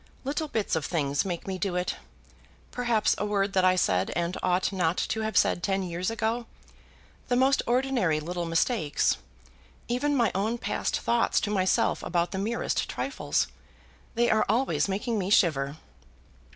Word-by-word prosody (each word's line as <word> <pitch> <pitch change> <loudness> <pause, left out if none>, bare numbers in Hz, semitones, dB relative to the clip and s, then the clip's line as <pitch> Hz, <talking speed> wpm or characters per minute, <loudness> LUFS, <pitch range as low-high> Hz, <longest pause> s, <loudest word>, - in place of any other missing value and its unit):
"Little 295 +3 -2
bits 220 - -1
of 160 - -1
things 145 -3 0
make 175 -3 -4
me 190 -1 -4
do 190 -2 -1
it; 180 0 -1 0.8
perhaps 240 -3 +1
a - - 0
word 200 -1 0
that 185 - +3
I 185 0 +5
said 95 - +1
and 175 +1 -1
ought 185 +2 +1
not 180 -2 +1
to 220 - -1
have 220 0 -1
said - - +3
ten 195 +2 0
years 180 +1 -2
ago; 225 +1 -2 0.8
the 245 - +1
most 265 +2 +3
ordinary 240 - +1
little 175 +3 -4
mistakes, 165 - +1 0.7
even 285 +5 0
my 235 -3 +3
own 215 +5 0
past - - -2
thoughts 235 0 +2
to 205 - -2
myself 190 -2 +1
about 170 0 -1
the 190 - -3
merest 225 +4 -1
trifles. - - -1 0.7
They 240 +1 +3
are 215 0 +3
always 240 +2 +1
making 210 +3 -1
me 190 0 -2
shiver." 150 -8 +2
195 Hz, 165 wpm, -27 LUFS, 175-235 Hz, 0.8 s, I